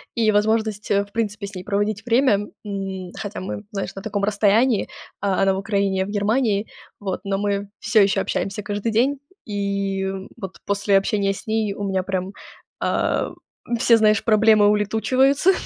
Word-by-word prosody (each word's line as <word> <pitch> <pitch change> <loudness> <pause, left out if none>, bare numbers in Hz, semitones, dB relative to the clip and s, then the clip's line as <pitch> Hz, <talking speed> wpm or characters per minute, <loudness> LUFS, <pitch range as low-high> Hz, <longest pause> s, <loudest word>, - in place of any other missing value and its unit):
и 225 -2 +3
возможность, 215 0 +1
в 200 0 +1
принципе, 210 -2 -2
с 200 - -11
ней 180 - -6
проводить 205 +2 -1
время, 235 -4 +2 0.2
м. 195 -3 -5
Хотя 205 +1 -5
мы, 190 +2 -5
знаешь, 195 -2 -4
на 195 - -6
таком 205 -1 -3
расстоянии. 210 +3 +2 0.3
А, 195 -2 +1
она 195 0 +4
в - - -2
Украине, 200 -1 0
я 190 - +1
в - - -8
Германии. 210 +1 +1 0.3
Вот, 195 -3 -3
но 195 -1 -1
мы 200 0 -1
всё 220 - +3
еще 195 0 +2
общаемся 195 +2 -2
каждый 205 +2 -2
день. 260 +6 +2 0.3
И, 200 -1 -2
м, 190 0 -4
вот 190 -5 -8
после 200 0 +2
общения 195 0 +1
с 195 - -11
ней 220 -2 0
у 205 - -6
меня 190 -1 0
прям, 190 0 -3 0.5
а, - - 0 0.5
все, 230 0 +5
знаешь, 215 0 +3
проблемы 215 -1 +5
улетучиваются. 255 - +3
205 Hz, 170 wpm, -22 LUFS, 195-220 Hz, 0.5 s, все